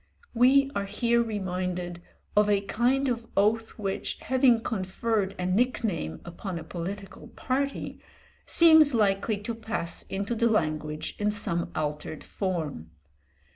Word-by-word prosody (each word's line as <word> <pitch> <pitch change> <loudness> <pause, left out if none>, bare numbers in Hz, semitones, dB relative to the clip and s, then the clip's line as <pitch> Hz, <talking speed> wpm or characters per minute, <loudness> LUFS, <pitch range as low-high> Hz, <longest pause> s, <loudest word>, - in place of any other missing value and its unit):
We 270 +3 +5
are 200 0 -2
here 235 +3 +2
reminded 180 -5 -3 0.3
of 210 0 +4
a 200 -1 +3
kind 250 +7 +1
of 235 -2 -2
oath 220 +3 +2
which, 195 -3 -3
having 255 -3 +3
conferred 200 -1 -1
a 180 - -3
nick 235 +8 +1
name 80 - -2
upon 175 +1 -6
a 165 - -6
political 195 +3 -7
party, 275 +2 -3 0.5
seems 315 -5 +7
likely 205 0 +2
to 235 - -3
pass 220 -6 -3
into 200 +4 -2
the 235 0 +2
language 155 -6 -1
in 210 0 +1
some 175 -5 -1
altered 150 0 -3
form. 160 - -3
205 Hz, 135 wpm, -27 LUFS, 180-235 Hz, 0.5 s, seems